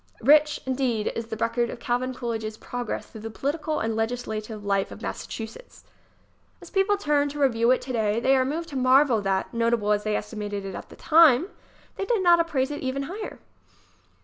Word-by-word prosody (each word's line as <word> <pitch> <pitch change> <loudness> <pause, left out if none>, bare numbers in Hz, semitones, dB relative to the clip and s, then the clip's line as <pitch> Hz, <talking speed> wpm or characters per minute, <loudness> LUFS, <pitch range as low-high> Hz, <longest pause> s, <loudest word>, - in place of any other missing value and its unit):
Rich, 300 +4 +5
indeed, 255 -5 0
is 230 -1 -4
the 225 - -4
record 230 +1 0
of 245 - -7
Calvin 245 +2 -1
Coolidge's 225 -3 -4
progress 245 -1 -5
through 220 - -12
the 225 - -5
political 295 +6 -2
and 225 0 -1
legislative 220 -2 -3
life 195 -1 +1
of - - -10
Massachusetts. 225 - -7 0.8
As - - -13
people 400 +1 +2
turn 295 -6 +1
to 295 +1 -7
review 235 -4 +3
it 255 - +4
today 225 -4 0
they 265 +3 +3
are 260 - +3
moved 325 +6 -3
to 280 - -8
marvel 255 -2 +4
that, 195 +2 -1
notable 230 -2 +1
as 210 0 +1
they 215 -1 0
esti 210 +1 -5
mated 205 -1 -4
it 195 - -5
at - - -8
the - - -12
time, 320 +1 +5 0.5
they 390 - -2
did 435 -3 +1
not 345 -1 +6
appraise 295 -5 0
it 290 - -5
even 265 +1 -2
higher. 395 +9 -6
245 Hz, 195 wpm, -25 LUFS, 220-290 Hz, 0.8 s, not